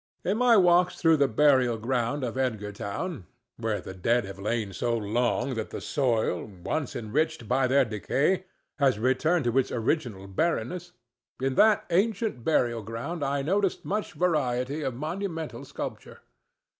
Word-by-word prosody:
In 200 +3 +1
my 240 -2 +5
walks 180 -1 +4
through 165 -2 +4
the 140 -1 +4
burial 130 -2 +3
ground 125 +4 -1
of 120 -3 -2
Edgartown—where 110 - -4
the - - -8
dead 115 +6 +1
have 100 0 -9
lain 105 -1 -2
so 120 +4 0
long 120 +4 0
that 110 -2 -4
the - - -6
soil, 120 - 0
once 110 - -4
enriched 145 +3 -1
by 130 +2 +2
their 135 +1 +4
decay, 140 - 0 0.3
has 135 -5 +3
returned 135 +7 +1
to 120 0 0
its 130 - -1
original 115 -5 -1
barrenness—in 130 - -3
that 215 +9 +4
ancient 200 - +1
burial 120 -6 +1
ground 115 - -5
I 140 0 0
noticed 195 +4 0
much 210 +1 -2
variety 140 -4 0
of 135 -4 -2
monumental 165 +3 -4
sculpture. - - -7
130 Hz, 145 wpm, -27 LUFS, 115-165 Hz, 0.3 s, my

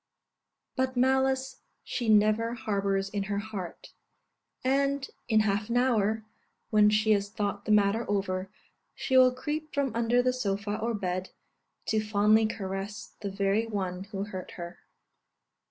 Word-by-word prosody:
But 260 -1 -1
malice 265 +1 +1 0.2
she 240 -3 -2
never 215 +2 +3
harbours 195 -3 -1
in 200 0 -3
her 200 0 -2
heart; 205 -4 -6 0.7
and 275 +1 +1 0.2
in 220 -2 +5
half 210 +1 0
an 235 - +1
hour, 220 -3 +2 0.5
when 210 -1 +6
she 215 +1 +2
has 200 -1 +2
thought 205 -1 -3
the - - 0
matter 210 +2 +3
over, 190 -2 -1 0.5
she 260 - -1
will 255 -1 +7
creep 300 +4 -4
from 280 -4 0
under 235 +1 +2
the 255 0 +2
sofa 205 -4 -2
or 230 0 -1
bed, 185 -2 -3 0.6
to 220 - +1
fondly 215 +1 +4
caress 195 0 -5
the 200 - -3
very 200 +3 0
one 190 -3 -3
who 200 -1 -4
hurt 190 -3 -7
her. 170 0 -7
215 Hz, 145 wpm, -29 LUFS, 200-240 Hz, 0.7 s, will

